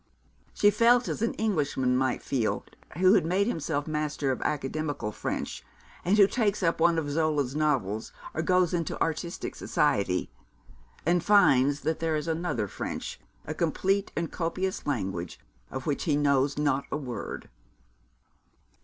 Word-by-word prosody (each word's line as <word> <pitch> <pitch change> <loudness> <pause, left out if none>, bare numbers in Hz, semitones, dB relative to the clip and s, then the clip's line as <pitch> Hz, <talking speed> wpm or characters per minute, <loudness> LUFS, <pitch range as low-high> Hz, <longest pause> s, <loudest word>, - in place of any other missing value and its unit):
She 205 - +5
felt 235 +3 +4
as - - -3
an 230 - 0
Englishman 145 -11 0
may 130 -1 +1
feel 120 -6 -1 0.3
who 185 +2 +5
has - - +4
made 185 +5 +1
himself 160 -8 -1
master 150 -3 -1
of 130 - -3
academical 145 -4 -2
French, - - -4 0.4
and 195 +4 +2
who 200 - +8
takes 205 -2 0
up 165 -1 +1
one 170 0 +4
of 145 -3 -1
Zola's 150 -3 0
novels, 125 -9 0 0.2
or 160 - -1
goes 180 +1 +2
into 170 -2 -2
artistic 165 +2 -2
society, 90 -2 0 0.7
and 175 +1 +2
finds 145 -9 +4
that 160 +1 -1
there 165 -1 0
is 150 0 -2
another 160 - -1
French, - - -5 0.3
a 155 - -3
complete 190 +5 0
and 170 -1 -2
copious 185 +2 -2
language, 95 -10 -3 0.3
of 130 -1 -6
which 145 - -1
he 155 -4 +2
knows 140 -1 +2
not 140 -2 +1
a - - 0
word. 125 -5 -6
155 Hz, 150 wpm, -28 LUFS, 135-175 Hz, 0.7 s, who